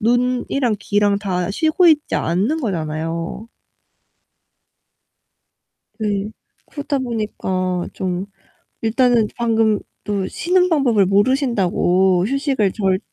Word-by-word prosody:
눈이랑 245 0 +1
귀랑 205 -1 +1
다 185 -3 -2
쉬고 320 - +3
있지 300 -2 +2
않는 200 - 0
거잖아요. 165 - -4 2.5
네. 205 -1 -2 0.4
그러다 285 -2 -2
보니까 190 -7 -2
좀 185 +1 -3 0.5
일단은 230 -1 +2
방금 225 -3 +2 0.3
또 200 -2 -2
쉬는 360 +1 +1
방법을 245 - +3
모르신다고, 195 -5 +2
휴식을 270 -6 0
잘 190 -3 0
215 Hz, 200 characters per minute, -19 LUFS, 190-255 Hz, 2.5 s, 쉬고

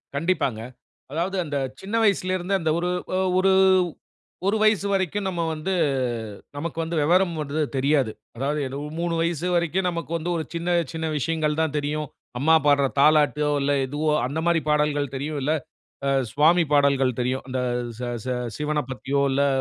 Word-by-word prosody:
கண்டிப்பாங்க, 140 -8 0 0.5
அதாவது 175 +5 -2
அந்த 145 -1 -2 0.2
சின்ன 205 +4 -4
வயசில 185 -3 +2
இருந்து, 185 +2 -3
அந்த 160 -1 +1
ஒரு 175 +1 -1 0.5
ஒரு 190 0 +4 1.0
1 215 +2 +2
வயசு 215 -2 +3
வரைக்கும் 195 +1 0
நம்ம 175 -3 -2
வந்து, 155 +5 -3 0.8
நமக்கு 165 +2 -4
வந்து 165 +1 -4
விவரம் 175 +2 +3
வந்து 150 +2 -3 0.2
தெரியாது, 135 -4 +2 0.3
அதாவது 145 +3 -1 0.4
3 170 -1 -1
வயசு 170 +1 -1
வரைக்கும் 175 +2 +1
நமக்கு 170 -1 -5
வந்து, 170 +2 -4
ஒரு 160 - -2
சின்ன 170 +1 -3 0.2
சின்ன 160 0 -2
விஷயங்கள் 155 +1 0
தான் 155 -2 -1
தெரியும், 150 0 -2 0.3
அம்மா 160 +4 +5
பாடுற 140 -1 +4
தாலாட்டோ, 150 -1 +4
இல்லை 140 +1 +2
எதுவோ 150 +2 -1 0.2
அந்த 155 +4 -3
மாரி 170 -2 +3
பாடல்கள் 145 -2 +1
தெரியும், 145 +2 -3
இல்லை 155 +3 +2 0.8
சுவாமி 165 +4 +4
பாடல்கள் 135 -3 +3
தெரியும், 130 +2 -1
அந்த 130 0 -2 0.4
சி 125 - -3 0.2
சி 130 - -1 0.2
சிவனைப் 150 -3 -2
பத்தியோ, 135 +2 -1
இல்லை 140 +1 +2
155 Hz, 155 wpm, -24 LUFS, 145-170 Hz, 1.0 s, அம்மா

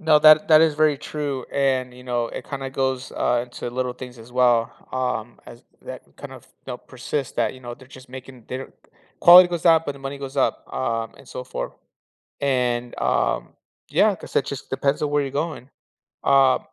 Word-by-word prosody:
No, 160 -3 +5
that 155 0 +7
that 155 -1 +7
is 160 -2 +3
very 155 -1 +3
true, 145 -3 -4
and, 130 -2 0
you 125 - -13
know, 120 -2 -1
it - - -8
kinda 135 -1 -5
goes 130 -1 -2
uh, 120 -1 +1
into 120 0 -7
little 125 0 -2
things 125 -1 -10
as 115 +2 -14
well 120 -2 +3 0.2
um, 125 -3 -3
as 120 - -13 0.2
that - - -8
kind - - -9
of, - - -12 0.2
you - - -5
know, - - -5
persist 140 -3 -5
that, - - 0
you 130 - -14
know, 120 -1 -7
they're 130 - -17
just 130 -1 -14
making 130 -1 -11
they 130 - -4
don't 135 - -10 0.5
quality 175 +1 +9
goes 175 0 -3
up, 165 -1 +5
but 145 - -2
the 140 - -14
money 135 +1 -6
goes 135 0 -8
up, 135 - 0
uh, 115 - -1
and 135 - -17
so 125 - -7
forth, 125 - -5 0.7
and, 125 -3 -1
um, - - 0 0.4
yeah, - - +3
'cause - - -12
it - - +2
just - - -7
depends 140 -1 0
on 150 - -1
where 145 0 +2
you're 135 - -4
going, 145 -2 -4 0.5
uh, 135 -1 +4
130 Hz, 210 wpm, -23 LUFS, 125-145 Hz, 0.7 s, quality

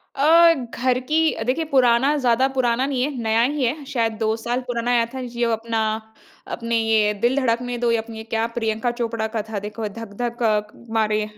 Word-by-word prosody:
अ, 330 +4 +6
घर 250 -1 -1
की 320 +1 +3
अ, - - -5
देखिए, 265 +7 0
पुराना 260 +2 +4
ज़्यादा 255 -2 +2
पुराना 250 +1 +1
नहीं 260 -3 -1
है, 285 - 0
नया 225 0 +2
ही 275 +2 0
है। 285 +5 -2
शायद 235 -5 -1
2 220 -1 +1
साल 240 +2 -2
पुराना 240 -1 -2
आया 240 -1 +3
था। 260 - -4
जी 240 -1 -2
वो 230 - +1
अपना, 225 0 -2 0.7
अपने, 230 -1 -2
"ये 220 -2 +2
दिल 245 +3 +2
धड़कने 245 -2 0
दो" 240 0 +1
या 230 - +2
अपनी 225 0 -10
ये 220 - -7
क्या 225 0 -1
प्रियंका 225 +1 0
चोपड़ा 230 -1 -1
का 220 - 0
था, 220 -2 -3
देखो 215 +1 -4
“धक-धक 235 +2 -5
अ, 215 -2 +3 0.3
मारे” 215 -1 +1
235 Hz, 205 wpm, -22 LUFS, 225-255 Hz, 0.7 s, अ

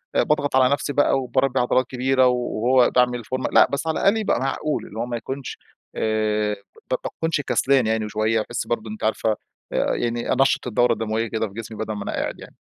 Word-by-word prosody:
باضغط 145 -2 +1
على 130 +1 +5
نفسي 145 0 -2
بقى 145 -1 +3
وباربي 130 0 0
عضلات 125 +1 +2
كبيرة 130 0 +2
و 125 - +3
وهو 125 +1 +2
باعمل 125 -1 +2
فورمة، 130 +3 -3
لأ، - - +6
بس 140 +3 -2
على 160 - 0
الأقل 200 +3 +3
يبقى 215 - 0
معقول 145 +3 -2
اللي 110 - -8
هو 115 - -1
ما 120 -1 -3
يكونش 135 +3 -6 0.4
آآ 110 -1 0 0.4
ب - - +3
باكونش 160 -2 -2
كسلان 135 -3 +2
يعني 110 -1 0
شوية، 110 +1 +1
باحس 120 +2 -4
برضه 110 -2 -2
أنتِ 110 - -8
عارفة 110 0 +1 0.4
آآ، - - +1
يعني 120 0 -1
أنشَّط 135 -1 +2
الدورة 120 +1 +3
الدموية 110 +1 -2
كده 110 0 -2
في 100 - -14
جسمي، 110 0 -7
بدل 110 0 -3
ما 105 -1 -5
أنا - - -4
قاعد - - -3
يعني. - - -13
120 Hz, 210 wpm, -23 LUFS, 110-135 Hz, 0.4 s, لأ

